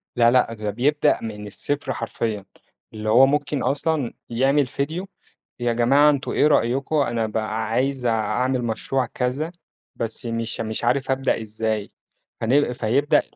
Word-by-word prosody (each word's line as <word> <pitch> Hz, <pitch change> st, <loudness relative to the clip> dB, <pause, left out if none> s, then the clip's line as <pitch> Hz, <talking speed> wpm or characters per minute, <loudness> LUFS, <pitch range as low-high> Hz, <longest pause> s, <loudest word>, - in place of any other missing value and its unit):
لأ، 120 Hz, -1 st, +5 dB
لأ، 125 Hz, -2 st, +3 dB
ده 105 Hz, -2 st, -4 dB
بيبدأ 140 Hz, +8 st, +2 dB
من 105 Hz, -2 st, -6 dB
الصفر 140 Hz, +5 st, -2 dB
حرفيًا، 110 Hz, -3 st, -3 dB, 0.5 s
اللي 110 Hz, 0 st, -4 dB
هو 125 Hz, +4 st, +7 dB
ممكن 145 Hz, +1 st, 0 dB
أصلًا 140 Hz, 0 st, 0 dB, 0.2 s
يعمل 135 Hz, +3 st, +2 dB
ڤيديو، 160 Hz, +9 st, -3 dB, 0.5 s
يا 120 Hz, -1 st, +1 dB
جماعة 135 Hz, +6 st, +5 dB
أنتم 140 Hz, -2 st, 0 dB
إيه 150 Hz, -, +3 dB
رأيكم 135 Hz, +2 st, +1 dB
أنا 120 Hz, -6 st, +1 dB
بقى 110 Hz, 0 st, -2 dB
عايز 130 Hz, +2 st, 0 dB
أعمل 125 Hz, +3 st, +1 dB
مشروع 125 Hz, +3 st, -1 dB
كذا، 130 Hz, +7 st, -2 dB, 0.4 s
بس 115 Hz, +1 st, -4 dB
مش 115 Hz, -1 st, -3 dB
مش 110 Hz, +1 st, -4 dB
عارف 135 Hz, +2 st, +1 dB
أبدأ 130 Hz, -3 st, 0 dB
إزاي، 110 Hz, -1 st, -3 dB, 0.5 s
فنل 125 Hz, +2 st, +2 dB
فيبدأ 140 Hz, +7 st, +2 dB
125 Hz, 145 wpm, -23 LUFS, 115-140 Hz, 0.5 s, هو